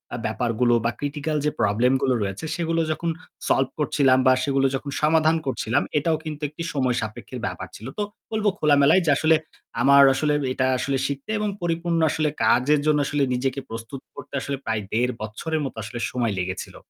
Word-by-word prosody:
আ - - -4
ব্যাপারগুলো 120 +1 +1
বা 115 - +2
critical 150 +1 -2
যে 150 - +2
problem 115 +6 +3
গুলো 130 -2 +2
রয়েছে 100 +9 -4
সেগুলো 165 -1 0
যখন 165 +2 -2 0.4
solve 135 -1 +2
করছিলাম 135 -3 +3
বা 130 - +7
সেগুলো 135 -1 +2
যখন 140 +1 -5
সমাধান 160 +1 +4
করছিলাম, 120 -3 0
এটাও 160 +2 +1
কিন্তু 150 -1 -6
একটা 165 +2 -7
সময় 130 -3 +1
সাপেক্ষের 110 0 -6
ব্যাপার - - -5
ছিল। 110 - -9
তো - - +1 0.3
বলবো 215 -1 +1
খোলামেলায় 150 +4 +5
যে - - +1
আসলে 160 0 +4 0.5
আমার 140 +2 +7
আসলে 150 +2 +1 0.2
এটা 130 - 0
আসলে 135 +1 -1
শিখতে 140 +9 -5
এবং 210 -1 0
পরিপূর্ণ 170 0 0
আসলে 155 0 0
কাজের 145 +4 +4
জন্য 150 -1 +3
আসলে 145 -1 0
নিজেকে 135 +2 -1
প্রস্তুত 115 +4 -7
করতে - - -11
আসলে 140 -1 -3
প্রায় 110 -1 -1
১.৫ 125 +3 +1
বছরের 150 +9 -3
মতো 130 - -6
আসলে 115 +2 -6
সময় 120 -4 -1
লেগেছিল। 95 +1 -4
140 Hz, 180 wpm, -24 LUFS, 125-155 Hz, 0.5 s, বা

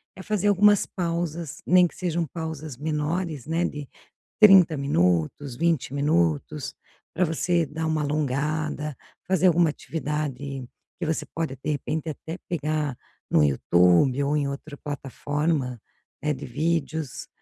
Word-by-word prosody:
é 190 - -9
fazer 205 -1 0
algumas 205 0 +5
pausas, 170 -3 -3
nem 180 0 +6
que - - -15
sejam 170 -2 -1
pausas 160 -2 -6
menores, 155 +1 -2
né, 165 +2 0
de 145 -4 -5 0.5
30 190 -6 +8
minutos, 105 - +1
20 165 -3 0
minutos, 85 - 0 0.4
para 180 - +1
você 170 +1 +1
dar 160 +3 -4
uma 155 -1 0
alongada, 150 +1 -1 0.3
fazer 190 0 +2
alguma 170 -1 +4
atividade 145 -4 -4 0.3
que 170 - -2
você 160 0 -1
pode, 160 -5 -2
de - - -2
repente, 155 +3 -2
até 160 +3 -6
pegar 150 -4 -1 0.3
no 75 - +5
YouTube 90 - +4
ou 145 +2 +1
em 145 - 0
outra 140 +2 -6
plataforma, 145 -1 -2 0.4
né, 150 0 +1
de 135 - -7
vídeos, 155 0 -2
150 Hz, 135 wpm, -25 LUFS, 140-165 Hz, 0.5 s, 30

